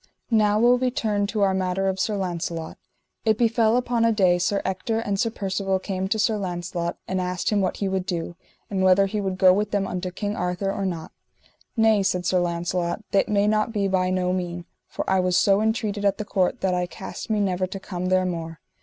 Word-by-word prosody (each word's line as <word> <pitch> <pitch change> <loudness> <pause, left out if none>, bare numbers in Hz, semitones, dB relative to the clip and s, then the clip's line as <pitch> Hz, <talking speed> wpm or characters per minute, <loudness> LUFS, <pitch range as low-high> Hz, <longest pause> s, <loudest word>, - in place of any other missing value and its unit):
Now 210 -2 +3
will 245 +2 +5
we 255 0 +1
turn 215 -6 0
to 210 0 -2
our 195 -1 +3
matter 190 0 0
of 190 0 -1
Sir 210 +2 0
Launcelot. 170 -3 -4 0.4
It 220 -2 +2
befell 230 0 +3
upon 245 -2 0
a 230 - +4
day 185 -5 +3
Sir 200 +3 +1
Ector 190 +4 -1
and 205 -3 -2
Sir 230 - +2
Percivale 195 -2 -1
came 190 0 -3
to 220 +3 0
Sir 215 0 +2
Launcelot 175 -2 -3
and 185 0 -1
asked 180 +2 -2
him 205 -1 +2
what 185 - -1
he 200 - -1
would 190 -1 -2
do, 170 -1 -3 0.3
and 195 -2 -2
whether 190 +1 +5
he 205 +2 -2
would 190 -2 -2
go 185 -1 +6
with 210 +2 0
them 200 -1 0
unto 185 0 -3
King 205 +3 -4
Arthur 180 +2 -1
or 195 -1 -2
not. 165 -3 -5 0.7
Nay, 220 -2 +4
said 180 -2 0
Sir 180 +1 +2
Launcelot, 175 +2 -1
that 195 - +2
may 205 -1 +2
not 215 +1 +1
be 205 -3 0
by 185 -1 +1
no 185 -1 0
mean, 175 -1 -3 0.2
for - - -5
I 190 0 +3
was 180 -1 +2
so 200 +2 +4
entreated 215 -2 -1
at 200 -1 +2
the 215 - -4
court 190 -3 0
that 190 -1 +1
I 180 0 0
cast 175 - -8
me 215 -1 +1
never 185 -2 0
to 195 +1 -6
come 185 -1 -4
there 185 0 +2
more. 165 -2 -4
190 Hz, 225 wpm, -24 LUFS, 180-210 Hz, 0.7 s, go